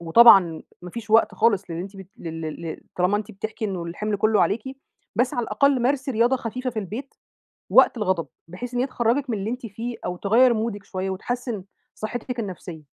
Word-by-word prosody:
وطبعًا 170 Hz, -2 st, +7 dB, 0.2 s
ما 180 Hz, -, -8 dB
فيش 220 Hz, +2 st, -7 dB
وقت 225 Hz, +1 st, +5 dB
خالص 210 Hz, -3 st, +3 dB
للي 165 Hz, +1 st, -3 dB
أنتِ 195 Hz, +1 st, -9 dB
بت 190 Hz, -1 st, -10 dB
لل 165 Hz, -1 st, -6 dB
لل 160 Hz, +1 st, -5 dB, 0.2 s
طالما 180 Hz, +3 st, +2 dB
أنتِ 215 Hz, +1 st, -7 dB
بتحكي 220 Hz, +3 st, -5 dB
إنُه 185 Hz, -4 st, -3 dB
الحِمل 205 Hz, +5 st, -2 dB
كُلُّه 215 Hz, +1 st, +3 dB
عليكِ، 215 Hz, +2 st, +1 dB, 0.5 s
بس 245 Hz, +3 st, +2 dB
على 240 Hz, -2 st, 0 dB
الأقل 255 Hz, +4 st, +2 dB
مارسي 270 Hz, +1 st, +1 dB
رياضة 240 Hz, +4 st, +3 dB
خفيفة 255 Hz, +1 st, -4 dB
في 225 Hz, -, -5 dB
البيت، 220 Hz, +7 st, -6 dB, 0.6 s
وقت -, -, +6 dB
الغضب، 185 Hz, -6 st, 0 dB, 0.2 s
بحيث 240 Hz, +8 st, -7 dB
إن 245 Hz, -, 0 dB
هي 265 Hz, -, +1 dB
تخرجِك 250 Hz, +2 st, 0 dB
من 220 Hz, -, 0 dB
اللي 200 Hz, +3 st, -3 dB
أنتِ 250 Hz, 0 st, -5 dB
فيه، 230 Hz, +4 st, -5 dB
أو 180 Hz, -, -3 dB
تغيَّر 235 Hz, +6 st, +4 dB
مودِك 220 Hz, -2 st, -2 dB
شوية، 190 Hz, 0 st, -3 dB
وتحسِّن 235 Hz, +1 st, -3 dB, 0.3 s
صحتِك 245 Hz, +3 st, -4 dB
النفسية. 180 Hz, -6 st, -6 dB
215 Hz, 195 wpm, -24 LUFS, 190-240 Hz, 0.6 s, وطبعًا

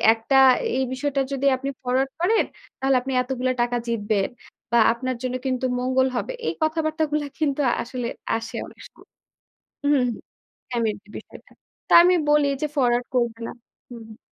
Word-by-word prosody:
"একটা 225 Hz, +4 st, 0 dB, 0.4 s
এই 265 Hz, -, +1 dB
বিষয়টা 275 Hz, +1 st, -1 dB
যদি 275 Hz, 0 st, -1 dB
আপনি 275 Hz, +2 st, -5 dB
ফরওয়ার্ড 260 Hz, +2 st, 0 dB
করেন, 435 Hz, +6 st, +3 dB, 0.4 s
তাহলে 270 Hz, 0 st, +3 dB
আপনি 265 Hz, +2 st, -5 dB
এতগুলা 255 Hz, 0 st, -1 dB
টাকা 240 Hz, 0 st, 0 dB
জিতবেন। 210 Hz, -3 st, 0 dB, 0.4 s
বা 235 Hz, -, +5 dB
আপনার 255 Hz, +1 st, -3 dB
জন্য 255 Hz, 0 st, -2 dB
কিন্তু 255 Hz, 0 st, 0 dB
মঙ্গল 260 Hz, +1 st, +2 dB
হবে।" 370 Hz, -, -2 dB, 0.2 s
এই -, -, -1 dB
কথাবার্তাগুলা 310 Hz, -1 st, 0 dB
কিন্তু 295 Hz, -2 st, 0 dB, 0.2 s
আসলে 245 Hz, 0 st, -5 dB, 0.3 s
আসে 225 Hz, 0 st, -6 dB
অনেক -, -, -16 dB
সময়। -, -, -21 dB, 0.8 s
উহুম, 285 Hz, -3 st, +3 dB, 0.6 s
ফ্যামিলি 220 Hz, -4 st, -2 dB
বিষয় -, -, -12 dB
থাকে। -, -, -24 dB, 0.3 s
তা -, -, +3 dB
আমি 360 Hz, +1 st, +5 dB
বলি 295 Hz, -1 st, +4 dB
যে, 305 Hz, -, +1 dB
"ফরওয়ার্ড 245 Hz, -3 st, +2 dB
করবে 235 Hz, -2 st, 0 dB
না।" -, -, -6 dB, 0.4 s
হুম, 235 Hz, -2 st, -9 dB
হুম 220 Hz, 0 st, -13 dB
255 Hz, 160 wpm, -23 LUFS, 240-285 Hz, 0.8 s, বা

